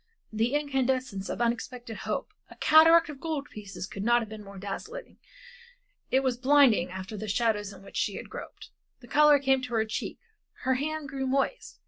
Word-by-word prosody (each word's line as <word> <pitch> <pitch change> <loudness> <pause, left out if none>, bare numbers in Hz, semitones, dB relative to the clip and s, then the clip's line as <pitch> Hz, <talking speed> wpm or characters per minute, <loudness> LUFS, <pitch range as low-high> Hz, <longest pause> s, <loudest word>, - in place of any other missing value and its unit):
The 230 +5 +1
incandescence 260 -8 -1
of - - -3
unexpected 235 0 -2
hope. - - -4 0.2
A - - -13
cataract 325 +2 +6
of 290 -2 -8
gold 305 -2 -4
pieces 200 -3 -7
could 200 0 -6
not 240 +2 +4
have 220 - -9
been 215 -1 -8
more 200 0 -11
dazzling; 430 - -7 0.9
it 265 - +3
was 260 -2 0
blinding 260 -8 +4
after 190 +3 -7
the 215 +1 -5
shadows 210 -1 0
in 195 -1 -13
which - - -9
she - - 0
had - - -7
groped. - - -10 0.3
The 240 - -14
color 300 +2 +6
came 270 -1 +2
to 250 -2 -4
her 220 -1 +2
cheeks, 215 - -5 0.4
her 260 - +2
hand 300 +3 -2
grew 270 0 -3
moist. 275 - -1
250 Hz, 185 wpm, -28 LUFS, 215-280 Hz, 0.9 s, cataract